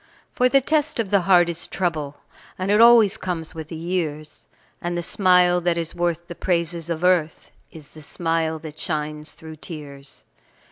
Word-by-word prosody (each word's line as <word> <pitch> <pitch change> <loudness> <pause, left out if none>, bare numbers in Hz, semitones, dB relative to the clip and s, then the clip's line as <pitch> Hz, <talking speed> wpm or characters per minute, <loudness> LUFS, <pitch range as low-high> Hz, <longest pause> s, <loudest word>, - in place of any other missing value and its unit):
For 250 0 +2
the 275 +1 +4
test 310 0 0
of 210 -4 -2
the 200 -2 +4
heart 175 -2 +6
is 170 0 -2
trouble, 155 -6 -3 0.4
And 185 +2 -1
it 210 +2 +5
always 230 -3 +7
comes 170 -5 -4
with 160 -1 -7
the 165 - -8
years, 160 -3 -4 0.3
And 175 0 -3
the 175 - -2
smile 180 -1 +3
that 170 -1 0
is 165 -1 -3
worth 170 -1 -2
the - - -7
praises 170 -2 -2
of 170 0 -3
earth 175 -3 +1 0.2
Is 155 -3 -13
the 155 - -13
smile 165 +1 -1
that 155 -1 -10
shines 150 -1 -3
through 160 -1 -11
tears. 145 -4 -10
170 Hz, 180 wpm, -22 LUFS, 155-185 Hz, 0.4 s, always